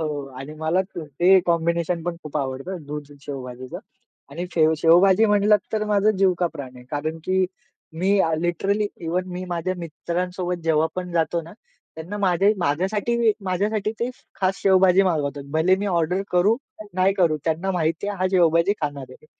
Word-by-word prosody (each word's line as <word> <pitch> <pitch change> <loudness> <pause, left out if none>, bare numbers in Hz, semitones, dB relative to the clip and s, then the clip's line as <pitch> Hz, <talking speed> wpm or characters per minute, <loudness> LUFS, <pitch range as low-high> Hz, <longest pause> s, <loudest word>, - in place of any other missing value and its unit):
हो, 160 - -1 0.3
आणि 140 +3 -8
मला 160 +4 +2
त 190 -1 -11 0.2
ते 185 +2 +7
कॉम्बिनेशन 170 0 0
पण 175 -1 -2
खूप 150 0 -6
आवडत, 135 +1 -3 0.2
दूध 145 0 -7
शेवभाजीचं. 130 -3 -7 0.5
आणि 170 +5 -5
फेव 160 -1 +4
शेवभाजी 180 +6 +5
म्हणलात 210 0 +4
तर 215 -1 0
माझं 210 0 +3
जीव 190 -1 +4
का 180 - +2
प्राण 130 -3 -8
आहे. 125 - -13
कारण 155 +2 -3
की 185 0 +2 0.6
मी 195 +2 +3
आ, 165 - +2
लिटरली 195 +5 0
इव्हन 180 +2 -2
मी 180 +1 -4
माझ्या 175 +1 -2
मित्रांसोबत 175 +2 -3
जेव्हा 160 -1 +3
पण 180 -1 -4
जातो 170 0 +1
ना. 165 +2 -12 0.4
त्यांना 165 +6 -6
माझ्या 195 0 +3
माझ्यासाठी 205 +9 +1
माझ्यासाठी 205 +3 -1
ते 240 +2 0 0.3
खास 190 0 +1
शेवभाजी 190 -1 +5
मागवतात. 145 -6 -1
भले 165 +4 +3
मी 200 +2 -3
ऑर्डर 180 0 0
करू, 185 +6 +4 0.4
नाही 185 +1 +3
करू, 170 -5 +2
त्यांना 165 +4 0
माहिती 165 +1 -1
आहे 205 - -3
हा 185 - +1
शेवभाजी 170 +1 +4
खाणार 145 -4 -4
आहे. 155 - -17
175 Hz, 170 wpm, -23 LUFS, 160-190 Hz, 0.6 s, ते